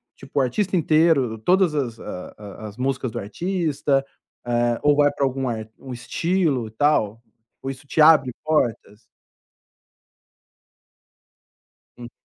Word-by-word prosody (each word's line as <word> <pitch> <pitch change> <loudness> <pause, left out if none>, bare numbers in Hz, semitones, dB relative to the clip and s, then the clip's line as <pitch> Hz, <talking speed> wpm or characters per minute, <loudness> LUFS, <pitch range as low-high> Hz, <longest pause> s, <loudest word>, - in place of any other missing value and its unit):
tipo, - - -11
o - - +4
artista 185 - 0
inteiro, 155 -7 +3
todas 180 - +3
as 120 -6 -2
a 90 - -8
a 105 +1 -9
as 105 +1 -11
músicas 130 -2 -2
do - - -4
artista? 145 - -1 0.4
Eh, 120 -1 +1
ou 145 0 +5
vai 145 -1 +4
para 140 - 0
algum 135 0 -2 0.3
um 130 -2 -8
estilo 145 +1 -1
e 110 - -12
tal? 115 -4 +1 0.4
Ou 135 - -4
isso 135 +1 -8
te 155 - +1
abre 150 -4 +6
portas? 115 -8 -1 3.0
Hum. 120 0 -9
135 Hz, 130 wpm, -23 LUFS, 120-155 Hz, 3.0 s, abre